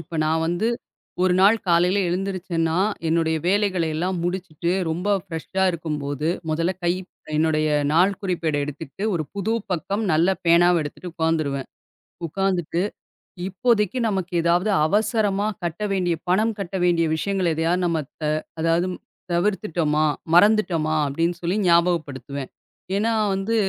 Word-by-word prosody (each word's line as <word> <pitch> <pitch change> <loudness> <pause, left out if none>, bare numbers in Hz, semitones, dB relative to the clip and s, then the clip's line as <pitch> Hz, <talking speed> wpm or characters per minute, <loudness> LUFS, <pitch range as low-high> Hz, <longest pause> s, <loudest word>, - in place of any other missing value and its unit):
இப்ப 165 0 -7
நான் 160 +1 +1
வந்து 175 +7 0 0.5
1 185 -1 +3
நாள் 205 +4 +6
காலையில 175 +3 +3
எழுந்திருச்சேன்னா, 175 -3 -1 0.3
என்னுடைய 160 -1 +1
வேலைகள 195 -2 +2
எல்லாம் 180 +2 -1
முடிச்சிட்டு 175 -2 -2 0.2
ரொம்ப 180 +5 -2 0.2
ஃபிரெஷ்ஷா 185 +2 -2
இருக்கும்போது, 150 -2 -3 0.2
முதல்ல 165 +4 0
கை 175 - +3 0.4
என்னுடைய 155 -1 +2 0.2
நாள்குறிப்பேட 180 -3 +1
எடுத்துட்டு 145 +4 -8
ஒரு 155 - -1
புது 200 +2 -1 0.2
பக்கம் 200 +5 -2
நல்ல 165 +4 +3 0.2
பேனாவ 170 +1 +5
எடுத்துட்டு 165 +4 -7
உக்காந்துருவேன். 155 -5 -1 0.6
உக்காந்துட்டு 180 -1 -1 0.7
இப்போதைக்கு 220 +2 +1
நமக்கு 190 -3 -2
ஏதாவது 175 +5 +2 0.2
அவசரமா 210 +1 +1 0.2
கட்ட 175 +4 -3
வேண்டிய 180 -3 +1
பணம் 215 +4 +2
கட்ட 195 -1 -5
வேண்டிய 170 -2 +3
விஷயங்களை 185 -1 0 0.3
நம்ம 170 -2 +1 0.3
த - - 0 0.4
அதாவது 165 +2 +2 0.4
தவிர்த்துட்டோமா, 170 -4 +1 0.3
மறந்துட்டோமா 175 -5 +4
அப்டின்னு 165 +5 -1
சொல்லி 175 +3 0
ஞாபகப்படுத்துவேன். 155 -6 +1 0.5
ஏனா 220 +3 +1 0.2
வந்து 195 +4 -1
175 Hz, 120 wpm, -23 LUFS, 160-195 Hz, 0.7 s, நாள்